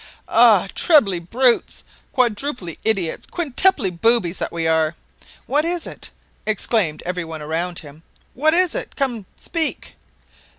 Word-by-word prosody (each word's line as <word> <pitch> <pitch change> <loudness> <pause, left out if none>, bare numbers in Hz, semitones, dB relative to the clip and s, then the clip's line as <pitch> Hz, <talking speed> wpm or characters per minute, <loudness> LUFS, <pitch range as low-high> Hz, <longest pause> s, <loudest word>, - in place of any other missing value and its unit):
"Ah! - - +5
trebly 220 - +4
brutes! 235 +8 +1 0.3
quadruply 240 - -1
idiots! 195 -7 -1
quintuply 300 - +1
boobies 185 0 +1
that - - -3
we 165 -1 -3
are!" 160 0 +1 0.5
"What 295 +2 +1
is 345 0 -2
it?" - - -8 0.3
exclaimed 210 -6 0
everyone 165 -3 -5
around 170 +3 -3
him. 150 +1 -7 0.3
"What 310 +5 +3
is 365 -1 +4
it?" - - -6
"Come, 240 -8 -2
speak!" 325 -3 -2
215 Hz, 125 wpm, -20 LUFS, 170-280 Hz, 0.5 s, Ah